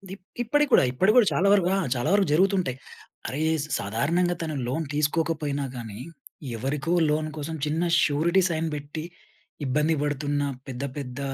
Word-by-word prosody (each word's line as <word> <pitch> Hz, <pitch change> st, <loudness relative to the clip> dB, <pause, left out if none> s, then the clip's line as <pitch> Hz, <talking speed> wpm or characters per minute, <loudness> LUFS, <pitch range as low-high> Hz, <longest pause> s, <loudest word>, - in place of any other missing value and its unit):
ఇప్ 190 Hz, -, -23 dB, 0.2 s
ఇప్పటికి 295 Hz, +4 st, +2 dB
కూడా, -, -, +7 dB
ఇప్పటికి 190 Hz, +11 st, +3 dB
కూడా 235 Hz, -5 st, +6 dB
చాలా 195 Hz, +3 st, +2 dB
వరకు 185 Hz, -3 st, +3 dB
ఆ! -, -, +1 dB, 0.2 s
చాలా 125 Hz, +6 st, -1 dB
వరకు 200 Hz, -2 st, +3 dB
జరుగుతుంటాయి. 185 Hz, -6 st, +2 dB, 0.5 s
అరేయ్ 160 Hz, +4 st, 0 dB, 0.2 s
సాధారణంగా 165 Hz, -, 0 dB
తను 155 Hz, -2 st, -3 dB
లోన్ 150 Hz, +6 st, -2 dB
తీసుకోకపోయినా 150 Hz, -1 st, 0 dB
గాని, 110 Hz, -2 st, -7 dB, 0.6 s
ఎవరికో 145 Hz, +7 st, -2 dB, 0.2 s
లోన్ 155 Hz, +1 st, 0 dB
కోసం 160 Hz, +2 st, -4 dB
చిన్న 155 Hz, +3 st, 0 dB, 0.2 s
షురిటీ 170 Hz, +6 st, +2 dB
సైన్ 165 Hz, 0 st, -1 dB
పెట్టి, 150 Hz, +2 st, -6 dB, 0.6 s
ఇబ్బంది 150 Hz, +5 st, +2 dB
పడుతున్న 145 Hz, 0 st, -1 dB, 0.3 s
పెద్ద 130 Hz, +2 st, -5 dB
పెద్ద 125 Hz, -1 st, -6 dB
155 Hz, 150 wpm, -25 LUFS, 145-175 Hz, 0.6 s, కూడా